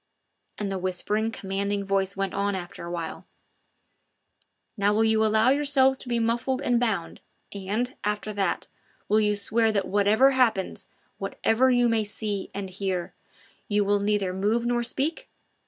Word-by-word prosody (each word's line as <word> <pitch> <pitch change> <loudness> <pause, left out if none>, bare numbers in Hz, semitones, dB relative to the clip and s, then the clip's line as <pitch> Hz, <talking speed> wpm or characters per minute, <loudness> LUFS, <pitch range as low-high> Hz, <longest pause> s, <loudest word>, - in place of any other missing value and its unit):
And 205 -2 -3
the 190 - -2
whispering, 195 +4 -1
commanding 200 -1 -2
voice 195 0 0
went 195 -1 -2
on 200 0 0
after 175 -2 -6
awhile: 170 -2 -5 1.5
"Now 205 0 +2
will 220 - +3
you 220 0 +3
allow 220 +2 +4
yourselves 270 -1 +3
to 250 - -8
be 240 - +1
muffled 235 +3 0
and 245 -3 +1
bound, 220 -8 -1 0.3
and, 210 +6 -2
after 210 +1 -2
that, 195 -3 -1 0.4
will 215 +1 +3
you 210 -1 +2
swear 220 +2 +1
that 200 -3 -1
whatever 210 +7 +4
happens, 235 -8 +1 0.3
whatever 255 +4 +1
you 245 -1 +4
may 225 -2 +2
see 205 -1 -4
or 200 - -2
hear, 185 -2 -3 0.5
you 205 -3 +1
will 205 +1 +2
neither 200 -2 0
move 210 +5 0
nor 240 0 +1
speak? 300 - -2
210 Hz, 155 wpm, -26 LUFS, 195-235 Hz, 1.5 s, allow